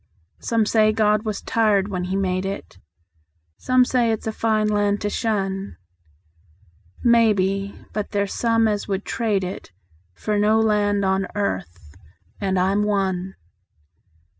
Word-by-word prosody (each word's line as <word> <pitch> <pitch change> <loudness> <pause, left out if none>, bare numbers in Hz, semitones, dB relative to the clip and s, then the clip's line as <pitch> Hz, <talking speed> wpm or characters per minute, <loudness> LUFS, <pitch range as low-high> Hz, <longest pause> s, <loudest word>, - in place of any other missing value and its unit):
Some 230 -2 0
say 215 0 +3
God 215 0 +2
was 215 -2 -3
tired 210 -3 +2
when 180 -2 -3
He 185 +1 -3
made 185 -1 0
it; 195 - -6 0.8
Some 255 0 +3
say 245 -3 +1
it's 220 - -3
a 220 - -1
fine 220 -1 0
land 205 -1 +1
to 205 - -2
shun; 195 -3 -2 1.3
Maybe; 200 -4 +2 0.2
but 210 -1 -3
there's 200 -1 -1
some 230 -1 +2
as 205 -1 -2
would 195 0 -3
trade 210 -4 -1
it 185 - -6 0.4
For 210 - -1
no 215 +2 +3
land 205 -2 +2
on 190 0 +1
earth 90 - -4 0.5
and 190 -1 -1
I'm 190 +3 +2
one. 190 -3 -1
205 Hz, 140 wpm, -22 LUFS, 195-215 Hz, 1.3 s, say